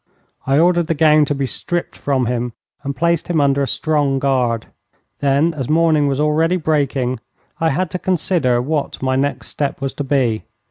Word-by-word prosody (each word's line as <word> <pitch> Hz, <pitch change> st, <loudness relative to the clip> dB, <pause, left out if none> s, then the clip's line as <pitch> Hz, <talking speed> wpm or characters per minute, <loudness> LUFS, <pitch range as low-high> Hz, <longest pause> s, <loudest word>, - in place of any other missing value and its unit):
I 135 Hz, +1 st, +3 dB
ordered 175 Hz, +1 st, +3 dB
the 165 Hz, -, 0 dB
gown 155 Hz, -1 st, +5 dB
to 145 Hz, -, -2 dB
be 135 Hz, 0 st, -1 dB
stripped 175 Hz, +6 st, -4 dB
from 135 Hz, -3 st, 0 dB
him 120 Hz, 0 st, -2 dB, 0.3 s
and 140 Hz, 0 st, -4 dB
placed 170 Hz, +1 st, 0 dB
him 175 Hz, -3 st, +1 dB
under 140 Hz, -1 st, +2 dB
a 140 Hz, -, 0 dB
strong 145 Hz, -3 st, 0 dB
guard. 125 Hz, -4 st, 0 dB, 0.5 s
Then, 145 Hz, +4 st, +2 dB
as 135 Hz, -6 st, -5 dB
morning 155 Hz, -2 st, +3 dB
was 140 Hz, 0 st, -1 dB
already 160 Hz, +4 st, +2 dB
breaking, 140 Hz, -6 st, 0 dB, 0.4 s
I 165 Hz, -, +2 dB
had 180 Hz, +4 st, -1 dB
to 180 Hz, -, -3 dB
consider 165 Hz, -10 st, +1 dB
what 145 Hz, -1 st, -3 dB
my 130 Hz, 0 st, +1 dB
next 140 Hz, +2 st, -1 dB
step 145 Hz, -2 st, -3 dB
was 135 Hz, -1 st, -3 dB
to 145 Hz, -, -4 dB
be. 130 Hz, -6 st, 0 dB
145 Hz, 185 wpm, -18 LUFS, 135-160 Hz, 0.5 s, gown